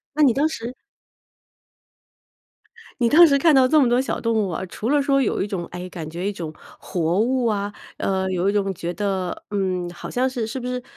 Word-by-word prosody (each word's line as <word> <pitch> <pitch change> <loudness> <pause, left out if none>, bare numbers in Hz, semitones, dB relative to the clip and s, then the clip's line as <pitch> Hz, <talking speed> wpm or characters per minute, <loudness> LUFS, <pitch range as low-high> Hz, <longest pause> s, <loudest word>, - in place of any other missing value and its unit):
那 305 - +2
你 275 -5 +6
当 285 +5 +2
时 245 -5 -6 2.3
你 235 - +4
当 335 +7 +8
时 280 -3 +3
看 310 +2 +4
到 265 -1 +6
这 305 +4 +4
么 260 - +4
多 240 +1 +3
小 270 - -2
动 230 - 0
物 215 -3 +1
啊， 175 +2 -3
除 210 +5 -5
了 290 +1 +3
说 275 0 +2
有 255 - 0
一 - - -1
种 190 -4 -4
诶， 180 +1 -6
感 165 -4 -7
觉 175 +5 -3
一 - - -2
种 165 -5 -6 0.3
活 170 0 -1
物 250 +3 +1
啊， 205 -2 -1 0.2
呃， 190 -1 -1
有 185 +1 0
一 - - +2
种 200 -1 0
觉 170 0 -4
得， 190 -3 -2
嗯， 185 -3 -1
好 175 - -9
像 255 +1 +1
是 240 -4 -3
是 235 +4 -5
不 245 - -6
是 250 0 -3
210 Hz, 235 characters per minute, -22 LUFS, 185-255 Hz, 2.3 s, 当